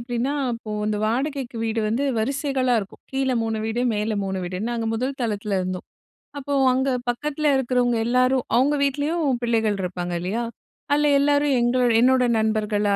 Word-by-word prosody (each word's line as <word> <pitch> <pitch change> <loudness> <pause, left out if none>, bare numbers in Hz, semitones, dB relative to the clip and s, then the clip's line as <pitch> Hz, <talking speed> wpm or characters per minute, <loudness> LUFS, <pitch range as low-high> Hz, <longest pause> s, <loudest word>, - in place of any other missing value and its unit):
எப்படின்னா, 240 +3 -2 0.2
அப்போ 230 -2 -7 0.2
அந்த 215 -1 0
வாடகைக்கு 260 +1 -2
வீடு 225 0 -1
வந்து 235 +6 0
வரிசைகளா 265 +1 0
இருக்கும். 195 - -11
கீழ 265 0 0
3 225 -1 -2
வீடு, 230 +2 -1
மேல 210 +1 -1
3 190 0 -2
வீடுன்னு. 185 +6 -3
நாங்க 230 -1 -2
முதல் 255 +4 -2
தளத்தில 210 -3 -1
இருந்தோம். 185 0 -4 0.5
அப்போ 285 0 -4 0.2
அங்க 265 +1 +1 0.2
பக்கத்தில 300 +5 -1
இருக்கிறவங்க 245 -2 +1
எல்லாரும் 255 +1 +2
அவங்க 265 +5 +3
வீட்லேயும் 285 0 0
பிள்ளைகள் 225 -3 +1
இருப்பாங்க 175 -1 -3
இல்லையா? 190 +7 -2 0.5
அதில 295 +1 +3
எல்லாரும் 285 0 +3
எங்களோ 245 +1 +2 0.2
என்னோட 255 +1 +4 0.2
நண்பர்களா 210 -2 +1
240 Hz, 155 wpm, -23 LUFS, 215-270 Hz, 0.5 s, என்னோட